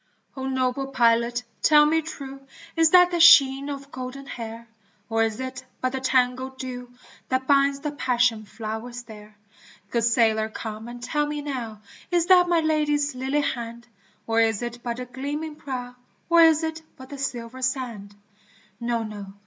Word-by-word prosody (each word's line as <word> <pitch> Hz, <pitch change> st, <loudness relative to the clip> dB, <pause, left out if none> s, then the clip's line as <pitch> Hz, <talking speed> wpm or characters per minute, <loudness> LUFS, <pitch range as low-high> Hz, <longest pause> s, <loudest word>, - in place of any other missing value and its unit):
O 265 Hz, -1 st, -4 dB
noble 260 Hz, 0 st, -1 dB
pilot 235 Hz, -1 st, +2 dB, 0.2 s
tell 300 Hz, -1 st, +6 dB
me 320 Hz, +2 st, +2 dB
true 275 Hz, -4 st, -8 dB, 0.3 s
Is 325 Hz, -1 st, +5 dB
that 360 Hz, +1 st, +6 dB
the 345 Hz, -, 0 dB
sheen 280 Hz, -5 st, +7 dB
of 275 Hz, 0 st, -7 dB
golden 260 Hz, +2 st, -7 dB
hair? 230 Hz, -3 st, -8 dB, 0.4 s
Or 225 Hz, 0 st, +2 dB
is 225 Hz, 0 st, 0 dB
it 260 Hz, -1 st, -5 dB, 0.2 s
but 255 Hz, -, -1 dB
the 265 Hz, -, -3 dB
tangled 260 Hz, 0 st, 0 dB
dew 250 Hz, -1 st, -6 dB, 0.4 s
That 260 Hz, 0 st, 0 dB
binds 275 Hz, 0 st, +3 dB
the 295 Hz, -, -3 dB
passion 245 Hz, -5 st, +1 dB
flowers 225 Hz, +3 st, -6 dB
there? 210 Hz, -2 st, -13 dB, 0.5 s
Good 235 Hz, -1 st, +1 dB
sailor 220 Hz, -2 st, +2 dB
come 220 Hz, 0 st, -7 dB
and 240 Hz, 0 st, -9 dB
tell 295 Hz, +4 st, 0 dB
me 295 Hz, 0 st, -4 dB
now 235 Hz, -7 st, -5 dB, 0.3 s
Is 345 Hz, -2 st, +2 dB
that 360 Hz, -1 st, +5 dB
my 340 Hz, -2 st, +3 dB
Lady's 295 Hz, -2 st, +1 dB
lily 265 Hz, +3 st, -1 dB
hand? 235 Hz, -3 st, -4 dB, 0.4 s
Or 225 Hz, 0 st, +1 dB
is 225 Hz, 0 st, +1 dB
it 240 Hz, 0 st, -6 dB
but 235 Hz, -1 st, -4 dB
the 250 Hz, -, -5 dB
gleaming 290 Hz, +5 st, -5 dB
prow, 250 Hz, -4 st, -6 dB, 0.4 s
Or 340 Hz, 0 st, +7 dB
is 320 Hz, -1 st, +5 dB
it 320 Hz, 0 st, -3 dB, 0.2 s
but 260 Hz, 0 st, -12 dB
the 280 Hz, -, -8 dB
silver 250 Hz, -1 st, -5 dB
sand? 240 Hz, -6 st, -3 dB, 0.6 s
No! 235 Hz, -1 st, -1 dB
no 205 Hz, -3 st, -8 dB
260 Hz, 170 wpm, -24 LUFS, 235-285 Hz, 0.6 s, sheen